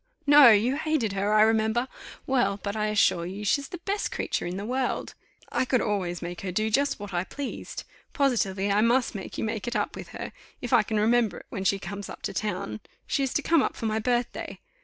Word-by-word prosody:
No, 290 -3 +9
you 230 +5 +4
hated 305 -10 0
her, 200 +1 0
I 215 0 +6
remember. 220 +2 +2 0.4
Well, 245 -7 +1
but 200 0 -3
I 215 0 0
assure 200 -5 +2
you 200 +3 -6
she's 280 +7 +1
the 355 - -7
best 400 +4 -2
creature - - -2
in 180 +2 -4
the 200 - -4
world; 255 +2 -2 0.4
I - - +1
could 255 -1 +2
always 185 -6 -2
make 175 0 -6
her 190 - -3
do 215 +4 0
just 280 +3 +1
what 205 -1 -7
I 175 0 0
pleased. 275 +8 -6 0.3
Positively, 205 -8 +1
I 205 +1 +3
must 240 +3 +2
make 195 -3 -7
you - - -2
make 220 +1 -3
it 240 - -2
up 210 - -1
with - - -8
her, - - -7 0.3
if 245 - -4
I - - +7
can 215 0 -1
remember 225 -2 +2
it, - - -11
when 195 - -5
she 195 +2 +3
comes 200 +1 -7
up - - -10
to - - -3
town 155 - -3 0.3
she - - 0
is 270 -2 0
to 295 - +1
come 330 -3 +4
up - - -1
for 230 - -5
my 220 0 0
birthday. 240 +1 -2
220 Hz, 230 wpm, -27 LUFS, 200-255 Hz, 0.4 s, No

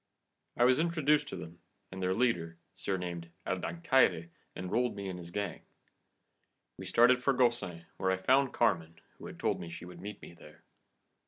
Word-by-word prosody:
I 120 - +4
was 125 +2 +5
introduced 150 -3 +2
to - - -5
them, 85 +1 -9 0.3
and 95 0 -6
their 95 0 +1
leader, 85 -9 0 0.2
surnamed 90 -3 -4 0.2
El 95 - -1
Dancaire, 130 - +2 0.2
enrolled 120 +7 -1
me 100 -1 -5
in 95 -1 -4
his 85 -1 -9
gang. 100 -1 -3 1.1
We - - -8
started 125 +2 +5
for 135 +2 +3
Gaucin, 120 -10 0
where 95 - 0
I 95 - +2
found 130 +7 +3
Carmen, 85 -8 +1 0.2
who - - -8
had - - -10
told - - 0
me 85 - -7
she 85 - -8
would 90 -1 -11
meet 105 +1 -7
me - - -11
there. 85 - -16
95 Hz, 175 wpm, -32 LUFS, 85-125 Hz, 1.1 s, was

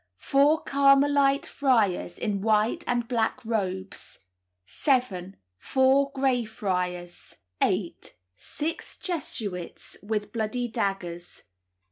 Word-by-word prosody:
Four 285 - +3
Carmelite 275 0 +4
friars, 220 -10 +1
in 205 -3 -2
white 220 - +2
and 240 -1 0
black 230 -2 0
robes. 190 -4 -3 0.5
7. 200 - 0 0.2
Four 270 - +3
Grey 265 -3 +2
Friars. 180 -5 -4 0.3
8. - - -1 0.2
Six 305 - -4
Jesuits 210 - -4
with 210 0 -3
bloody 235 +2 -2
daggers. 195 -6 -4
225 Hz, 90 wpm, -27 LUFS, 195-275 Hz, 0.5 s, Carmelite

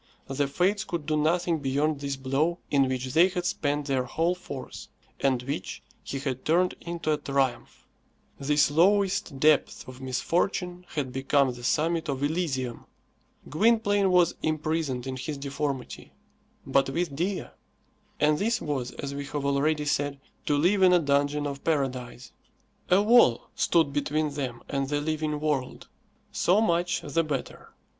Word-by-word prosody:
The 140 +1 -1
Fates 185 +8 +1
could 170 -7 -4
do 155 0 0
nothing 165 +2 +1
beyond 145 +2 0
this 140 -1 -3
blow 135 +6 0
in 135 -2 +3
which 130 0 -3
they 170 +3 +6
had 180 -2 -4
spent 145 -3 -1
their 135 -3 0
whole 165 +7 0
force, 145 -7 -8 0.3
and 130 -3 +1
which 125 -8 -5 0.2
he 135 - -4
had 130 -2 -4
turned 180 +3 +2
into 170 -2 -2
a - - 0
triumph. 135 -3 -2 0.5
This 145 +1 +2
lowest 190 -1 +2
depth 150 -2 +2
of 130 0 -10
misfortune 180 +7 -1
had 135 -4 -2
become 135 0 +2
the 120 0 -11
summit 160 +5 0
of 135 0 -2
Elysium. 145 -6 -2 0.6
Gwynplaine 205 - +3
was 180 -2 +4
imprisoned 155 -4 -1
in 130 -1 -4
his 145 +3 -4
deformity, 140 -1 -4 0.5
but 135 0 +2
with 165 0 -2
Dea. 185 +6 -1 0.7
And 150 0 +3
this 225 +3 +1
was, 135 -5 -3
as 140 0 -5
we 140 0 -5
have 145 0 -4
already 150 +2 +1
said, 145 -1 -1 0.3
to 145 - +2
live 185 +7 +3
in 185 -1 +6
a 180 - +6
dungeon 145 0 +1
of 140 -1 -5
paradise. 130 -6 -2 0.6
A 190 +3 +5
wall 215 - +5
stood 160 -4 +2
between 150 +1 0
them 130 -4 -5
and 135 -1 -2
the 145 0 0
living 155 0 -2
world. 145 -4 -2 0.4
So 185 +4 +3
much 175 -4 +1
the 165 +2 0
better. 145 -4 -5
150 Hz, 155 wpm, -27 LUFS, 135-170 Hz, 0.7 s, they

